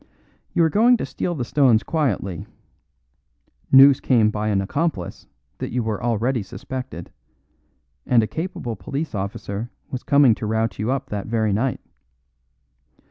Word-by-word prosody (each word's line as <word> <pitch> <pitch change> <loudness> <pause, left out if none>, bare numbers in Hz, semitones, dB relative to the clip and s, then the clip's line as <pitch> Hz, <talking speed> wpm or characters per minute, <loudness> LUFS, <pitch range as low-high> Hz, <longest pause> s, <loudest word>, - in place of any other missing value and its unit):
You 170 - +3
were 160 - +2
going 240 +6 +5
to - - -3
steal 175 - -3
the 125 -5 -3
stones 125 -5 +3
quietly; 105 - -2 1.2
news 135 0 +8
came 110 -5 +3
by 105 0 -2
an 100 -2 +1
accomplice 100 - -3 0.3
that - - -4
you 125 0 -1
were 110 -2 -3
already 120 +1 0
suspected, 125 -2 -7 1.0
and 120 -3 +4
a - - -1
capable 160 - -4
police 145 +7 -5
officer 100 +2 -4 0.2
was 130 - -4
coming 140 -4 +5
to 110 - -5
rout 110 -2 -1
you 110 +3 -1
up 135 0 -2
that 100 -2 -4
very 110 -2 0
night. 120 +5 -1
120 Hz, 145 wpm, -22 LUFS, 105-135 Hz, 1.2 s, news